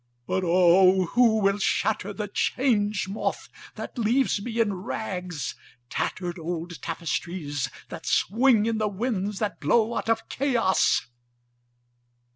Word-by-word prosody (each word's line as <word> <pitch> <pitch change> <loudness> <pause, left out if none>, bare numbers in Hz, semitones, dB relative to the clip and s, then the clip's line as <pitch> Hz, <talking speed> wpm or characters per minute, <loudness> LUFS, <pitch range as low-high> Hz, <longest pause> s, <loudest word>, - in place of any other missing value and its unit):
(But 190 - -1
O 185 +2 +5
who 235 -3 +5
will 200 +1 +2
shatter 205 0 0
the 210 +1 -4
Change 210 -3 0
Moth 195 +3 -3 0.3
that - - -7
leaves 235 -1 +2
me 230 +2 -4
in 215 -3 +2
rags—tattered 180 - -5
old 170 -2 -5
tapestries 165 -3 -3 0.2
that - - -8
swing 225 +1 +3
in 225 -1 0
the 215 - +1
winds 205 -1 -2
that 210 -1 -2
blow 230 0 +2
out - - -3
of 225 0 0
Chaos!) 245 -8 +2
200 Hz, 120 wpm, -26 LUFS, 180-225 Hz, 0.3 s, O